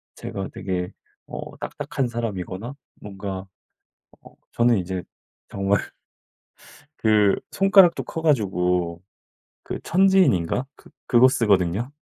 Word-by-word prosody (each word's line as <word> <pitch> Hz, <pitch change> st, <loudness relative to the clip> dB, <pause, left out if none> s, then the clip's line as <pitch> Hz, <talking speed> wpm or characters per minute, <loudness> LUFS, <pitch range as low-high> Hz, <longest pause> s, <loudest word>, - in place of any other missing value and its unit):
제가 95 Hz, 0 st, -6 dB
되게 90 Hz, -2 st, -3 dB, 0.4 s
어 -, -, -8 dB
딱딱한 135 Hz, -, -3 dB
사람이거나 115 Hz, 0 st, -5 dB, 0.3 s
뭔가 95 Hz, -1 st, -6 dB, 0.8 s
어 -, -, -17 dB, 0.2 s
저는 120 Hz, -1 st, +3 dB
이제 90 Hz, 0 st, -4 dB, 0.5 s
정말 100 Hz, 0 st, 0 dB, 1.2 s
그 105 Hz, -2 st, +4 dB, 0.2 s
손가락도 195 Hz, -3 st, +5 dB
커 160 Hz, -, -6 dB
가지고 90 Hz, -, +1 dB, 0.6 s
그 -, -, -5 dB
천지인인가 175 Hz, -, +3 dB
그 -, -, -19 dB, 0.2 s
그거 125 Hz, +1 st, +6 dB
쓰거든요. 105 Hz, -1 st, +1 dB
105 Hz, 220 characters per minute, -23 LUFS, 95-130 Hz, 1.2 s, 그거